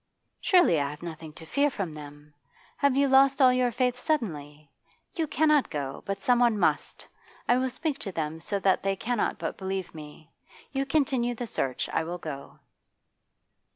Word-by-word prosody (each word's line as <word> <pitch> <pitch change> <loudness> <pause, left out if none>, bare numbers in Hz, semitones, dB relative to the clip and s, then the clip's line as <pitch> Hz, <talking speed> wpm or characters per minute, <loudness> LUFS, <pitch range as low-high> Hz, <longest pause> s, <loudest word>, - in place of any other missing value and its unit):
'Surely 350 - +4
I 140 - -1
have 150 +3 -10
nothing 160 -2 -7
to 160 - -11
fear 285 - +2
from 195 - -4
them? 145 0 -12 0.4
Have 280 -2 +2
you 280 +1 +3
lost 270 +1 +5
all 255 -2 +6
your 250 -1 +2
faith 250 +1 0
suddenly? 155 - -3 0.4
You 325 -2 -1
cannot 305 -1 +3
go, 140 -3 -4
but 195 0 -2
someone 240 -1 +3
must. - - 0 0.4
I 245 - +4
will 260 0 0
speak 285 +2 -3
to 195 - +2
them 160 -2 -3
so 200 +5 -2
that 190 -1 +3
they 195 0 0
cannot 235 +3 -1
but - - -5
believe 190 -1 -4
me. 155 0 -12 0.4
You 275 -1 -2
continue 265 -4 +1
the 245 - -4
search; 135 - -2
I - - 0
will 175 +2 -5
go. 145 -5 -8
205 Hz, 175 wpm, -27 LUFS, 155-265 Hz, 0.4 s, all